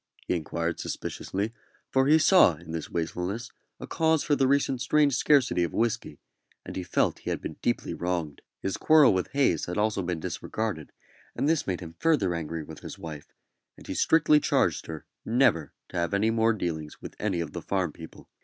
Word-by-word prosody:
he - - 0
inquired, 85 0 -2
suspiciously; 100 +4 -4 0.4
for 130 0 +3
he 155 +2 +6
saw 160 - +6
in 80 +1 -11
this 80 -1 -4
wastefulness 90 +7 -3 0.3
a - - -6
cause 160 -1 +1
for 145 - +2
the 135 -2 +2
recent 135 -2 +1
strange 145 -2 +3
scarcity 130 -11 +3
of 85 - -3
whisky; 115 -1 -1 0.5
and - - -7
he 95 - -2
felt 90 - 0
he - - -6
had - - -1
been - - -7
deeply - - -1
wronged. 85 -5 -3 0.2
His 95 - -1
quarrel 155 -7 +6
with 95 -1 0
Hayes 135 - +2
had 90 - -4
also 105 -1 +1
been 90 -2 -3
disregarded, 100 -1 -4 0.4
and - - 0
this 160 0 +1
made 95 -2 -2
him 80 -2 -8
further 130 - +2
angry 80 -1 -4
with 80 0 -10
his - - -9
wife, 75 -3 -9 0.5
and - - -14
he - - -4
strictly 155 -2 +4
charged - - +1
her 80 -1 -7 0.2
never 110 - +2 0.2
to - - -6
have 85 +2 0
any 110 +3 +2
more 115 0 +3
dealings 80 -7 -4
with - - -9
any 100 -5 -1
of 80 -3 -4
the - - -5
farm 95 -4 -1
people. 80 -1 -12
95 Hz, 195 wpm, -27 LUFS, 85-130 Hz, 0.5 s, he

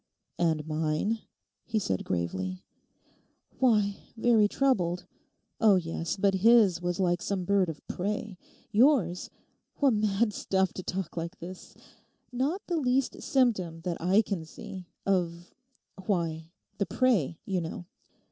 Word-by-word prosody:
'And 160 -3 +1
mine?' 155 +8 0 0.4
he 225 - -2
said 95 - -1
gravely. 90 +1 -2 1.0
'Why—very 220 -1 +2
troubled; 185 -9 +1 0.5
oh 215 -3 +6
yes—but 180 +3 0
his 215 -6 +6
was 175 0 -2
like 175 -2 +1
some 190 -3 -2
bird 195 -2 +2
of 155 - -8
prey. 205 +2 -3 0.4
Yours—what 235 - +1
mad 210 +1 +1
stuff 190 -1 0
to - - -5
talk 185 -1 -4
like 170 +3 -4
this!—not 250 - -6
the 345 - -1
least 260 -2 0
symptom, 195 - +1
that 170 0 -3
I 190 +6 +4
can 195 -6 -3
see, 180 +3 -9 0.2
of—why, 180 -2 -3 0.3
the 200 - +2
"prey," 200 - +2
you 190 -3 -1
know. 165 +1 -6
190 Hz, 115 wpm, -29 LUFS, 170-220 Hz, 1.0 s, oh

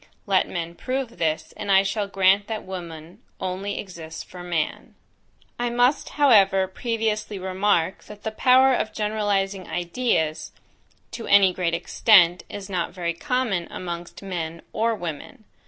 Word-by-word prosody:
Let 195 -2 +2
men 170 -1 -4
prove 255 +3 -4
this, 160 -1 -1
and 205 -2 -3
I 195 0 +6
shall 200 +1 -1
grant 195 +1 +3
that 220 -1 -4
woman 170 -3 -8 0.2
only 190 +2 -3
exists 165 -4 -7
for 180 - -11
man. 175 -3 -3 0.6
I 240 0 0
must, 245 +4 +2
however, 195 -9 +5
previously 215 0 -2
remark, 190 -1 0
that 210 -1 -12
the 220 - -2
power 260 +4 +5
of 215 -3 -1
generalizing 205 -3 -1
ideas, 170 -2 -1 0.6
to 230 0 -7
any 195 -2 +6
great 170 -2 0
extent, 175 -1 +4
is 200 -2 -7
not 180 -3 -2
very 170 -2 -2
common 240 - -1
amongst 175 +1 -7
men 170 -3 -5
or 230 0 +1
women. 175 +2 -7
195 Hz, 140 wpm, -24 LUFS, 175-215 Hz, 0.6 s, I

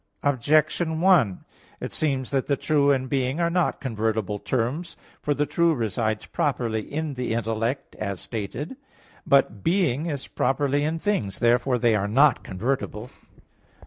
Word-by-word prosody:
Objection 155 +4 +2
1: 165 - +3 0.3
It - - -5
seems 135 -4 -1
that 135 -2 0
the 140 - +1
true 145 -1 +2
and 130 -2 +2
being 135 +2 -1
are 170 0 +1
not 180 -1 +1
convertible 110 -4 -2
terms. 130 - -2 0.2
For 145 - 0
the 145 - +1
true 170 +1 +2
resides 110 -2 -1
properly 120 -6 -1
in 155 0 -2
the 125 -3 -2
intellect, 115 +4 -2
as 100 -3 -3
stated 115 - -5
(A. - - -5
1); - - -18 0.5
but 130 -7 +3
being 165 -4 +1
is 145 -4 -3
properly 145 +1 0
in 155 +2 0
things. 160 - -1
Therefore 120 +2 +2
they 120 -1 +3
are 100 -1 +1
not 140 +8 +4
convertible. 120 +2 -3
135 Hz, 155 wpm, -25 LUFS, 115-150 Hz, 0.5 s, not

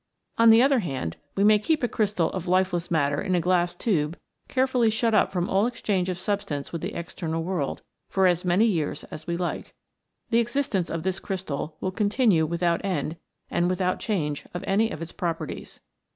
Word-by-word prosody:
On 230 0 +7
the 225 +2 +8
other 270 -1 +4
hand, 135 - -3 0.2
we 195 - +2
may 210 0 +6
keep 305 +6 0
a - - +3
crystal 205 -7 0
of 185 -1 -5
lifeless 180 -1 +1
matter 145 -3 +1
in 185 -2 0
a - - +3
glass 175 0 +1
tube 165 -8 0 0.3
carefully 255 -3 +2
shut 225 +1 +1
up 215 - +3
from 180 -2 -1
all 195 +4 +2
exchange 195 -6 -1
of 180 - -2
substance 185 -8 -2
with 165 - -3
the - - -4
external 165 -1 -3
world 170 -6 -2 0.3
for 190 -1 +2
as 180 -1 +3
many 180 +5 +3
years 170 -9 -1
as 155 - -8
we 170 0 -1
like. 175 -1 -4 0.6
The 230 - +4
existence 235 -7 0
of 165 -1 -3
this 190 0 -1
crystal 160 -5 -4
will 185 - -1
continue 205 - +2
without 170 +1 0
end 165 -4 -2 0.3
and 175 +1 +1
without 185 0 0
change 150 -9 -2
of 175 - -4
any 215 +3 +2
of 165 -6 -5
its 165 - -7
properties. 170 -3 -5
185 Hz, 195 wpm, -26 LUFS, 165-210 Hz, 0.6 s, the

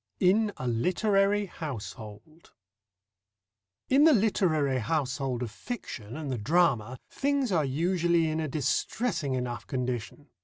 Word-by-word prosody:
IN 205 +4 +3
A 125 - -4
LITERARY 195 - +2
HOUSEHOLD 125 - -8 1.4
In 275 +3 +5
the 320 0 +7
literary 160 - +2
household 130 -1 -1
of 115 - -5
fiction 120 - -7
and 150 -4 -4
the 125 - -2
drama, 130 -3 +2
things 280 -4 0
are 165 -4 +2
usually 170 +3 +1
in 155 0 -1
a 155 - -1
distressing 145 - -1
enough 125 -1 -4
condition. 125 +2 -4
155 Hz, 120 wpm, -28 LUFS, 125-190 Hz, 1.4 s, the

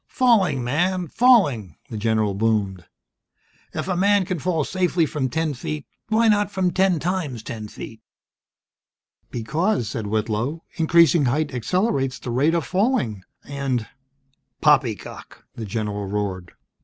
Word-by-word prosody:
"Falling, 205 - +2
man, 175 +7 0
falling!" 145 - +3 0.2
the - - -5
general 110 -1 +1
boomed. 100 -4 -1 0.9
"If - - -3
a 185 - 0
man 200 +1 +3
can 180 -1 -3
fall 165 -1 0
safely 180 0 +1
from 140 -3 -2
ten 160 +1 -1
feet 150 +3 -5 0.2
Why 225 +1 +3
not 205 -1 +3
from 190 -3 0
ten 190 -1 +2
times 160 - -2
ten 110 -2 -6
feet!?" 110 +1 -10 1.3
"Because," 150 - -1
said 110 0 -4
Whitlow, 110 +8 -2
"increasing 165 -2 +4
height 145 +3 0
accelerates 135 - 0
the 120 - -6
rate 145 +7 +2
of 170 - 0
falling, 185 - 0 0.2
and 135 -5 -2 0.4
" 135 0 -47
"Poppycock!" - - 0
the 115 - -6
general 105 -1 -3
roared. 95 -3 -3
140 Hz, 135 wpm, -23 LUFS, 110-180 Hz, 1.3 s, increasing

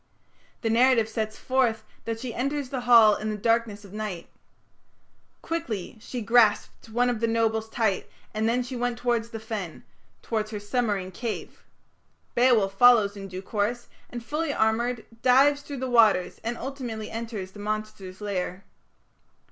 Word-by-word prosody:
The 225 - 0
narrative 235 -1 +4
sets 220 -1 -3
forth 255 -4 +1 0.2
that 225 -1 -3
she 240 -1 -5
enters 275 +2 -2
the 260 -2 -3
Hall 225 -3 +8
in 215 - -4
the 215 - -3
darkness 225 -1 0
of 195 - -14
night. 210 -5 -5 1.2
"Quickly 235 - -4
she 245 +1 -5
grasped 225 -1 +2
one 240 +3 +2
of 245 -3 0
the 230 - +1
nobles 225 -1 0
tight, 220 -5 0 0.2
and 220 +1 0
then 245 +2 +1
she 250 +1 -7
went 245 0 -1
towards 235 -1 0
the 225 - -6
fen", 215 -7 -6 0.4
towards 215 -2 -2
her 215 -2 -5
submarine 205 -3 -1
cave. 225 +4 -6 0.7
Beowulf 235 -6 +3
follows 230 -5 +6
in 195 -1 -7
due 185 0 -7
course, 220 +4 -2 0.2
and, 240 -1 -7
fully 305 +5 -1
armoured, 230 0 0 0.2
dives 275 +3 +5
through 285 -1 -7
the 260 0 -3
waters 215 -6 +4
and 235 +1 -3
ultimately 245 -5 -5
enters 225 -4 -5
the 205 - -13
monster's 210 -2 -5
lair. 190 -2 -3
225 Hz, 155 wpm, -26 LUFS, 210-245 Hz, 1.2 s, Hall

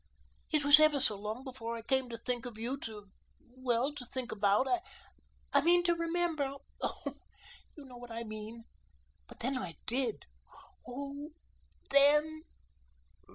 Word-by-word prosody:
It 300 -3 +2
was 290 +1 +10
ever 310 -2 +5
so 215 - +3
long 210 +5 -5
before 240 -3 -5
I 225 - -8
came 265 +1 +1
to 230 - -5
think 245 +1 -3
of 230 -3 -9
you 235 +4 -2
to, 210 -3 -9 0.4
well, 255 +2 0
to 285 - -7
think 250 0 -5
about 205 +4 +2 0.9
I 280 - +6
mean 350 +3 +4
to 345 -1 +3
remember 335 -4 -1 0.3
oh, - - -3 0.6
you 295 - -11
know 250 -2 -11
what 245 0 -10
I 230 0 -5
mean. 215 +1 -8 0.6
But - - -12
when 260 +1 0
I 170 -4 -5
did, 245 -2 -1 0.6
oh, 280 +3 -6 0.6
THEN!" 300 +3 +5
255 Hz, 150 wpm, -32 LUFS, 230-290 Hz, 0.9 s, was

